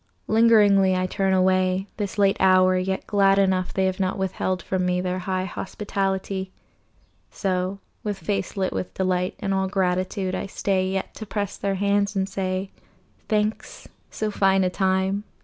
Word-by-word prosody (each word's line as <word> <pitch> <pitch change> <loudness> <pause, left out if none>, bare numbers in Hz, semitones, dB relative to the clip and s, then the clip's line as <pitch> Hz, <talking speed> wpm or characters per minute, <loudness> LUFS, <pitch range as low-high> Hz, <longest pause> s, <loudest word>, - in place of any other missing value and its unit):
Lingeringly 210 -4 +5
I 185 0 0
turn 190 +1 0
away, 185 0 +2
This 205 -2 -4
late 200 -1 +4
hour, 185 -1 +5
yet 190 +1 -1
glad 195 -2 +3
enough 190 -2 +2
They 190 - 0
have 190 0 -1
not 190 +1 0
withheld 185 -1 -2
from 190 -1 -1
me 180 0 +1
Their 180 0 -2
high 185 0 -2
hospitality. 195 -1 -3 0.8
So, 185 0 -2 0.3
with 205 -2 -2
face 195 +2 -3
lit 190 -1 0
with 185 - -4
delight 185 -1 0
And 195 - -1
all 190 0 +1
gratitude, 185 0 -1
I - - -3
stay 190 -1 0
Yet 190 0 -3
to 220 - -8
press 205 -1 -3
their 195 -1 -2
hands 200 +1 +1
and 190 0 0
say, 190 0 -3 0.6
"Thanks. 215 0 -2 0.2
So 215 -1 -3
fine 195 -1 +3
a 180 - +1
time 190 +1 0
190 Hz, 165 wpm, -24 LUFS, 185-200 Hz, 0.8 s, Lingeringly